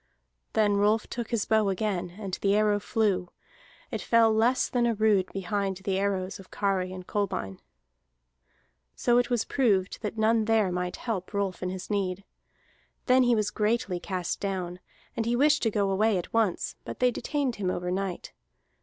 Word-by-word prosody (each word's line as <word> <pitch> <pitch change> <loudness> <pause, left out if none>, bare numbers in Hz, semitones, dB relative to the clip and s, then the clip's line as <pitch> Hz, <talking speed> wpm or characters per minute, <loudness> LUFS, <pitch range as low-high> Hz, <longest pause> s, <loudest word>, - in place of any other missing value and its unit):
Then 205 -2 +3
Rolf 210 +2 +2
took 235 -2 -5
his 230 -3 0
bow 220 -2 +3
again, 185 -3 -2
and 195 -3 -6
the 200 0 +3
arrow 210 -1 +3
flew; 205 -4 0 0.6
it - - -3
fell 230 -1 +4
less 235 +4 +2
than 240 -1 +1
a 230 - +1
rood 210 -3 +2
behind 195 0 -2
the 190 0 -1
arrows 195 -1 -1
of 190 - -13
Kari 190 -2 -1
and 185 -1 -8
Kolbein. 180 - -2 1.4
So 240 0 +3
it 245 - 0
was 240 -3 +1
proved 200 -9 +1
that 215 0 -4
none 220 0 +3
there 220 -4 +2
might 180 0 -2
help 205 -4 -4
Rolf 195 -3 -1
in 180 - -2
his 185 +2 -6
need. 195 -2 -1 0.8
Then 255 0 +5
he 245 -1 +4
was 210 -2 0
greatly 210 -4 0
cast 180 -1 -3
down; 185 -3 -3 0.4
and 225 0 -1
he 240 - +2
wished 300 +4 +4
to 225 - +2
go 200 -2 0
away 210 +1 +2
at 175 - -6
once, 220 -6 0
but - - -7
they 250 0 +3
detained 275 0 -2
him 190 -3 -1
over 180 0 -2
night. 190 -1 -3
205 Hz, 180 wpm, -27 LUFS, 185-225 Hz, 1.4 s, Then